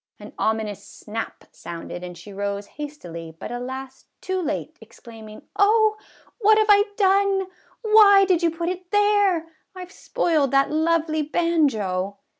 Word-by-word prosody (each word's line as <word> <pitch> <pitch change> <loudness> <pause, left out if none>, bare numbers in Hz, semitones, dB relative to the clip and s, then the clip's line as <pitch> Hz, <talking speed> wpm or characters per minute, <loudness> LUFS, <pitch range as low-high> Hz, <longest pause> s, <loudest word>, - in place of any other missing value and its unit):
An - - -12
ominous 215 -2 -2
snap 215 +2 -7
sounded 170 +1 -8
and 180 -1 -8
she 205 - -12
rose 200 0 -3
hastily, 175 - -9
but, - - -8
alas! 260 +2 -7
too 375 0 -3
late, 335 - -4
exclaiming, 220 -2 -13
" - - -53
Oh, 430 +1 +4 0.4
what 430 -1 +5
have 435 -1 +4
I 410 0 +5
done? 390 -1 +2 0.4
Why 420 -3 +6
did 365 -3 +2
you 340 - +3
put 335 +1 -3
it 365 0 -6
there? 410 -5 +2 0.3
I 365 -1 -7
've 365 - -21
spoiled 315 -6 0
that 275 +2 +2
lovely 315 0 +1
banjo 265 - 0
315 Hz, 150 wpm, -23 LUFS, -, 0.4 s, Why